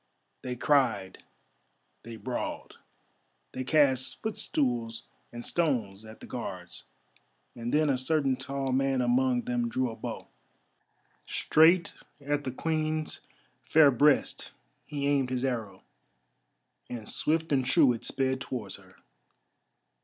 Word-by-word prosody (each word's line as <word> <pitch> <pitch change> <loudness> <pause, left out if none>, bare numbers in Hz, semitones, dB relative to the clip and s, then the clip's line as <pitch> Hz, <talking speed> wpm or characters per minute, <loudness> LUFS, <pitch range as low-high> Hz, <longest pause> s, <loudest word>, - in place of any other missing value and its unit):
They 125 -1 -4
cried, 125 -9 +1 0.8
they 115 +1 -9
brawled, 125 +2 -5 0.7
they 130 - -4
cast 130 -3 +2
footstools 120 - -1 0.3
and 120 0 -7
stones 115 - -1
at 110 0 -13
the - - -9
Guards, 95 -7 -7 0.7
and 120 0 -4
then 155 +1 +3
a 135 -3 +1
certain 135 -1 +1
tall 135 0 -3
man 135 0 +1
among 125 0 +2
them 120 -1 -1
drew 130 0 -1
a - - -8
bow. - - -6 1.0
Straight 165 +3 +4 0.3
at 145 0 -2
the 130 - -2
Queen's 155 +2 -2 0.4
fair 150 -3 +6
breast 145 +3 +2 0.3
he 145 -2 -3
aimed 140 -3 +2
his 130 0 -1
arrow, 115 -6 -3 1.1
and 115 -3 -6
swift 160 +1 0
and 135 -2 +3
true 130 0 +4
it 115 - -7
sped 130 0 -1
towards 120 -8 -5
her. - - -19
130 Hz, 125 wpm, -29 LUFS, 120-145 Hz, 1.1 s, fair